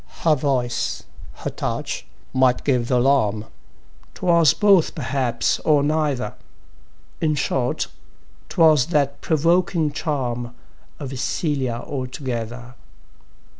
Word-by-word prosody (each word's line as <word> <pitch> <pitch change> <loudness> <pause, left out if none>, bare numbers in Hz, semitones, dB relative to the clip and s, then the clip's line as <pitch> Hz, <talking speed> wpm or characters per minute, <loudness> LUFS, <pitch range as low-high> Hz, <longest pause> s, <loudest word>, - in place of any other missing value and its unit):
Her 160 - +5
voice, 130 -4 -1 0.3
her - - -5
touch, - - -4 0.3
might 130 -1 +3
give 125 -4 +1
th' 130 - -1
alarm 120 -5 +2 0.7
'Twas 170 -4 +4
both 195 -5 +4
perhaps, 125 -4 0
or 150 -2 +3
neither; 145 -7 0 0.9
In 155 -2 +2
short, 130 -3 0 0.6
'twas 155 -4 +4
that 140 -4 0
provoking 165 0 +2
charm 125 -6 -3 0.4
Of 140 -3 -6
Cælia 130 -2 -2
altogether. 125 -3 -5
140 Hz, 95 wpm, -22 LUFS, 125-155 Hz, 0.9 s, Her